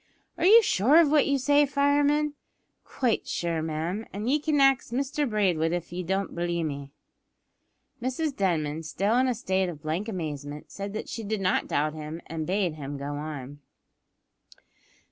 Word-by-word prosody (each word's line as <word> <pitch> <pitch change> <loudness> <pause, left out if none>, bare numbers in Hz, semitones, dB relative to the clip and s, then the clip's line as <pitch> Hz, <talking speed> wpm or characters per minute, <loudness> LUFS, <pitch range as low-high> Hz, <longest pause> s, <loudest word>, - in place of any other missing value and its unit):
"Are 340 +1 +2
you 450 +3 +8
sure 255 - +4
of 310 -4 +4
what 300 -2 +4
you 280 -1 +2
say, 290 +2 +4
fireman?" 285 +1 +2 0.5
"Quite 245 -5 -1
sure, 170 -2 -1
ma'am; 165 +7 -3
ye 240 +9 0
can 300 -1 +1
ax 270 -1 +4
Mr 275 +3 -1
Braidwood 180 -7 +1
if 175 -1 -4
ye 180 - -3
don't 190 +2 -2
b'lieve 170 -1 -1
me." 140 -2 -5 1.1
Mrs 260 +4 -2
Denman, 160 -5 0
still 200 +7 0
in 260 - +3
a 250 - 0
state 190 -5 0
of 150 -4 -9
blank 165 +8 -2
amazement, 150 -6 -5
said 200 0 -6
that 215 - -5
she 230 - -5
did 215 0 -2
not 185 -1 +1
doubt 150 +1 0
him, 155 +1 -6
and 160 -1 -5
bade 185 -3 0
him 145 -2 -6
go 140 +1 -4
on. 145 -2 -6
190 Hz, 165 wpm, -27 LUFS, 155-265 Hz, 1.1 s, you